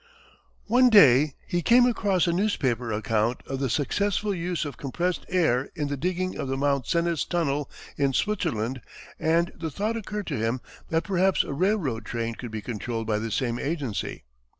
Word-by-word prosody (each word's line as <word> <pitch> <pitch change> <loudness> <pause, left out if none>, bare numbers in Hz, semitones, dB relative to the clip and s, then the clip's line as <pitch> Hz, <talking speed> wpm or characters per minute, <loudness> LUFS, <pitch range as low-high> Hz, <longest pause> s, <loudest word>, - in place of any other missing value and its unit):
One 250 +3 +5
day 145 - +6
he 175 - -1
came 245 +7 +6
across 200 -7 +2
a 170 - +1
newspaper 130 - 0
account 110 +2 0
of 135 -1 -4
the 135 -1 0
successful 200 - 0
use 175 -2 -2
of 145 - -5
compressed 175 +6 -2
air 160 -8 +2
in 150 -4 -2
the 145 - -1
digging 185 +5 -2
of - - -2
the 135 0 -2
Mont 140 -3 0
Cenis 170 -2 +1
tunnel, 150 -5 -1 0.3
in 140 -1 +2
Switzerland, 125 - -1 0.4
and 170 +2 +2
the 160 - -4
thought 210 +9 -2
occurred 210 -2 -4
to 145 -6 -3
him 115 +3 0 0.3
that 165 0 +1
perhaps 190 -1 +2
a - - -5
railroad 160 - 0
train 115 0 -3
could 120 +1 -7
be 110 -1 -6
controlled 115 0 -4
by 105 -1 0
the 115 +1 -3
same 120 +1 -1
agency. 140 - -3
145 Hz, 175 wpm, -26 LUFS, 125-185 Hz, 0.4 s, day